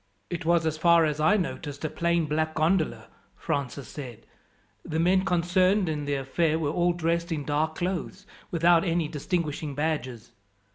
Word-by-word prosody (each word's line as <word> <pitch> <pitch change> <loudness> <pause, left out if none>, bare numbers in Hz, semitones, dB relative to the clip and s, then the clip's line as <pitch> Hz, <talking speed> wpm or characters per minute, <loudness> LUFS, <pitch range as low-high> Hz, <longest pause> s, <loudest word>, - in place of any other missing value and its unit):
"It 170 -1 -4
was, 170 -1 +3
as 155 -1 -1
far 170 0 +5
as 150 -1 -2
I 180 +8 +4
noticed, 155 -5 -4
a - - +2
plain 170 -1 +1
black 155 +1 -1
gondola," 160 +2 +1 0.3
Francis 140 -1 -3
said. 125 -7 -9 0.6
"The 160 - -4
men 185 +3 +3
concerned 185 +2 +2
in 150 -2 -2
the 145 0 -1
affair 150 +4 0
were 150 -3 -1
all 175 +2 +2
dressed 170 0 -1
in 150 -3 -2
dark 155 +2 0
clothes, 180 0 -3 0.2
without 170 0 +4
any 170 -3 0
distinguishing 150 -1 -3
badges." 135 -7 -3
160 Hz, 160 wpm, -27 LUFS, 150-175 Hz, 0.6 s, far